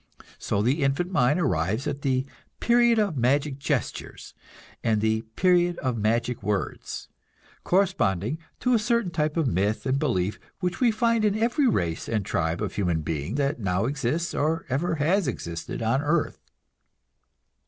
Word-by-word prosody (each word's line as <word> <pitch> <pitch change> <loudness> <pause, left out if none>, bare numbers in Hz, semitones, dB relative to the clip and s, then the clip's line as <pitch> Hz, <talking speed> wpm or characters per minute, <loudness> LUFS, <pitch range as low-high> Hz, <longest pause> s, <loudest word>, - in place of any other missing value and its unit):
So 100 - 0
the 135 +7 +1
infant 140 +7 0
mind 145 -1 +3
arrives 110 - 0
at 145 -1 -3
the 130 -1 +1 0.3
"period 240 -1 +4
of 205 -6 +1
magic 135 +3 +1
gestures" 140 -5 -3 0.5
and 110 -2 +2
the 110 +1 +1
"period 175 -1 +3
of 130 -3 -1
magic 115 +2 0
words"; 100 0 -3 0.6
corresponding 140 - +1 0.2
to 250 0 +2
a 235 - +4
certain 235 -4 0
type 155 -1 -1
of 165 - +2
myth 105 -1 0
and 135 +1 +1
belief 105 -10 0 0.2
which 180 -2 -2
we 245 - +4
find 230 0 +2
in 210 -1 +2
every 240 +5 +2
race 85 - -1
and 110 -4 -1
tribe 80 -1 -1
of - - -3
human 90 -5 0
being 80 - -3
that 140 -1 0
now 95 -1 0
exists 145 +5 -1
or 160 +3 0
ever 160 +7 0
has 165 +4 +1
existed 85 -2 -4
on 115 +5 +2
earth. 150 +2 0
140 Hz, 155 wpm, -26 LUFS, 110-175 Hz, 0.6 s, period